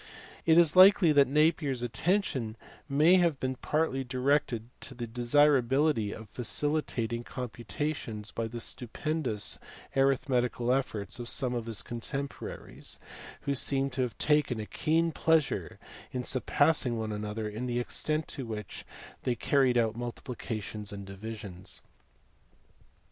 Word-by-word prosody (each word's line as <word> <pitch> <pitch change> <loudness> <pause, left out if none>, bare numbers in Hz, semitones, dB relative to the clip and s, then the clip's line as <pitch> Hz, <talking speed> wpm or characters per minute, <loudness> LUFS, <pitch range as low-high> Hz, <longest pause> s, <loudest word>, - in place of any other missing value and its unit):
It 160 0 +6
is 170 -2 +5
likely 185 -2 +8
that 140 -2 +5
Napier 150 +1 +3
s 120 -1 -4
attention 120 - 0 0.3
may 155 +6 +5
have 170 -6 +2
been 130 0 -1
partly 150 -3 0
directed 130 -2 0
to 130 - -7
the 120 -1 -4
desirability 130 0 +3
of 110 +1 -8
facilitating 120 -1 -1
computations 120 -1 -5
by 115 -1 -2
the 120 +1 -6
stupendous 125 -1 -2 0.4
arithmetical 125 -3 +2
efforts 125 -4 -2
of 120 - -5
some 130 -3 +1
of 120 -2 -3
his 105 -5 -2
contemporaries, 135 +4 -6 0.4
who 140 - -1
seem 135 0 +1
to 130 +1 -2
have 125 -5 -2
taken 150 -6 +2
a 105 - -4
keen 165 +7 +1
pleasure 160 -1 +1 0.3
in 125 -1 -3
surpassing 130 -1 +2
one 110 -1 -3
another 105 +1 -3
in 110 +4 -4
the 120 0 0
extent 155 +5 -1
to 135 - -3
which 105 -3 -6 0.4
they 125 - 0
carried 130 +1 +2 0.2
multiplications 115 -3 -5
and 100 -1 -7
divisions. 100 -2 -8
125 Hz, 130 wpm, -30 LUFS, 115-145 Hz, 0.4 s, likely